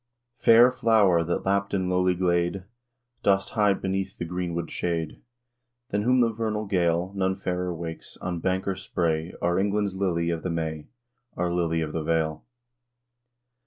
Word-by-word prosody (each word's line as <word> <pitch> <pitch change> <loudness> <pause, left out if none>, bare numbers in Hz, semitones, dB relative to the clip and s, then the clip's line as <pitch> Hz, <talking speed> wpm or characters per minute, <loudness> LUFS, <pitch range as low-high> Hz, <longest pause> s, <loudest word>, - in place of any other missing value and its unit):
Fair 120 +2 +7
flower, 105 -8 +3
that, 85 +1 -2
lapt 100 +1 +1
in 95 -1 0
lowly 90 0 +2
glade, 85 +1 0 0.6
Dost 95 0 +2
hide 105 -3 +2
beneath 95 0 -2
the 85 - -4
greenwood 85 -1 -3
shade, 85 -2 -3 0.7
Than 105 - +1
whom 125 +3 +3
the 115 -1 +3
vernal 110 -1 -2
gale 90 -1 0
None 95 -1 +1
fairer 90 -1 -2
wakes, 80 -1 -7
on 90 -1 -4
bank 95 +2 -1
or 95 - +1
spray 85 -3 -2
Our 85 +1 +2
England's 100 0 0
lily, 85 -3 0
of 85 -1 -3
the 90 - -3
May, 80 -2 -3 0.5
Our 90 0 0
lily 85 -2 0
of 75 -1 -3
the 80 - -1
vale! 80 -1 -1
90 Hz, 160 wpm, -26 LUFS, 85-100 Hz, 0.7 s, Fair